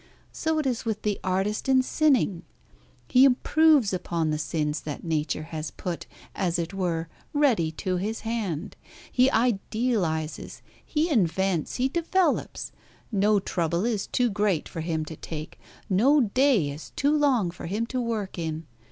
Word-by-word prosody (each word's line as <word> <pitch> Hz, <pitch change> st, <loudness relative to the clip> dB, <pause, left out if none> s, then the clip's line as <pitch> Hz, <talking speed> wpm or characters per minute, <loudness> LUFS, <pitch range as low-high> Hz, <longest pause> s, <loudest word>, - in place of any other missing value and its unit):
So 320 Hz, 0 st, -1 dB
it 305 Hz, -, 0 dB
is 250 Hz, -3 st, -1 dB
with 220 Hz, -2 st, -3 dB
the 210 Hz, -2 st, 0 dB
artist 195 Hz, +6 st, -1 dB
in 260 Hz, -1 st, +5 dB
sinning. 260 Hz, -, +2 dB, 0.7 s
He 255 Hz, -, +5 dB
improves 275 Hz, -2 st, +4 dB
upon 170 Hz, -3 st, -1 dB
the 150 Hz, -, -1 dB
sins 150 Hz, -1 st, -1 dB
that 150 Hz, -2 st, -6 dB
Nature 155 Hz, -2 st, -1 dB
has 155 Hz, -1 st, -3 dB
put, 175 Hz, -2 st, -5 dB, 0.3 s
as 180 Hz, -3 st, 0 dB
it 170 Hz, +2 st, -3 dB
were, 170 Hz, -4 st, -1 dB, 0.3 s
ready 245 Hz, -, +3 dB
to 185 Hz, +3 st, -2 dB
his 215 Hz, +5 st, -3 dB
hand. 215 Hz, -9 st, -3 dB, 0.4 s
He 255 Hz, +1 st, +4 dB
idealises, 215 Hz, -, -1 dB, 0.2 s
he 310 Hz, +1 st, 0 dB
invents, 190 Hz, -, +1 dB
he 255 Hz, +1 st, +1 dB
develops. 340 Hz, +5 st, 0 dB, 0.4 s
No 205 Hz, 0 st, +3 dB
trouble 170 Hz, 0 st, -1 dB
is 220 Hz, -4 st, -1 dB
too 245 Hz, -2 st, +1 dB
great 205 Hz, -5 st, 0 dB
for 165 Hz, -, -6 dB
him 160 Hz, -1 st, -2 dB
to 160 Hz, -, -7 dB
take, 155 Hz, 0 st, -7 dB, 0.3 s
no 250 Hz, +11 st, +4 dB
day 230 Hz, -, +3 dB
is 150 Hz, +3 st, -9 dB
too 290 Hz, +2 st, +2 dB
long 260 Hz, -, +2 dB
for 175 Hz, -, -8 dB
him 210 Hz, +6 st, -1 dB
to 255 Hz, +1 st, -2 dB
work 215 Hz, -6 st, -3 dB
in. 160 Hz, -1 st, -3 dB
200 Hz, 155 wpm, -26 LUFS, 165-250 Hz, 0.7 s, in